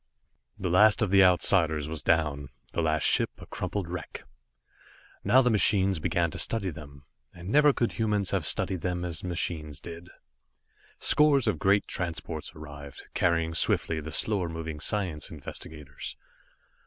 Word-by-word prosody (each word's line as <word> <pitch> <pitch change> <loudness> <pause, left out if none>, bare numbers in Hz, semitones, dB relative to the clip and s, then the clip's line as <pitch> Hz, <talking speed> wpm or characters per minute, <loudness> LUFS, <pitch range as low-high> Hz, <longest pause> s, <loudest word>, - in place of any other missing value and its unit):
The 90 -2 -3
last 105 +5 +5
of 100 - -1
the 100 0 +6
Outsiders 85 -4 +2
was 80 -2 -4
down, 75 -3 0 0.2
the - - 0
last 80 -2 0
ship - - +4
a - - -12
crumpled 100 -4 -4
wreck. 90 0 -7 1.0
Now 125 +7 +5
the 125 - +2
machines 100 -4 +3
began 85 +1 0
to - - -6
study 100 -5 0
them. 70 -2 -12 0.3
And 90 +1 -9
never 150 +4 +5
could 120 -3 -1
humans 105 -4 -1
have - - 0
studied 95 -3 -1
them 90 -1 -2
as 85 -3 -4
the - - -6
machines 80 -4 -3
did. 85 +3 -10 0.9
Scores 145 -4 +3
of 80 - 0
great 100 +1 +3
transports 85 -3 -5
arrived, 70 -2 -11
carrying 85 -1 +1
swiftly 80 0 +2
the 80 +1 -7
slower 90 +2 0
moving 80 -2 -6
science 90 -3 -2
investigators. 75 -1 -8
85 Hz, 155 wpm, -27 LUFS, 80-100 Hz, 1.0 s, the